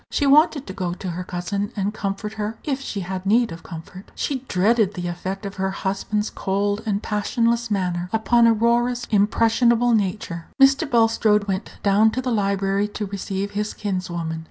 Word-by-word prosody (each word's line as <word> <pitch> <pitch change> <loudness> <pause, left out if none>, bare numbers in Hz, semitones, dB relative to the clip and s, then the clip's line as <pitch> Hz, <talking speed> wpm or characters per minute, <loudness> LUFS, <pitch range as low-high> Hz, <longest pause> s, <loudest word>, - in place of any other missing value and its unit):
She 290 - 0
wanted 295 0 +4
to 190 - -7
go 180 -2 -3
to 185 -1 -5
her 180 +2 -4
cousin, 200 +4 -3
and 200 0 -1
comfort 210 0 -4
her, 215 +1 -4
if 275 -2 -2
she 210 -7 -4
had 185 +1 -4
need 225 +3 +3
of 165 0 -8
comfort. 175 +3 -10
She 275 -3 -2
dreaded 205 +1 +2
the 175 -1 -3
effect 185 +4 -5
of 200 0 -6
her 190 0 0
husband's 195 +2 -2
cold 205 +2 -1
and 205 0 -1
passionless 230 +2 0
manner 180 -3 -1
upon 230 +1 +4
Aurora's 235 +2 +2
impressionable 230 +3 +3
nature. 190 -5 -1
Mr. 270 +3 +5
Bulstrode 225 -3 +3
went 190 0 -3
down 205 +2 +4
to - - -1
the 255 -1 -2
library 200 -1 +1
to 210 0 -5
receive 200 0 -4
his 210 +1 -3
kinswoman. 175 -5 -3
205 Hz, 175 wpm, -22 LUFS, 190-230 Hz, -, Mr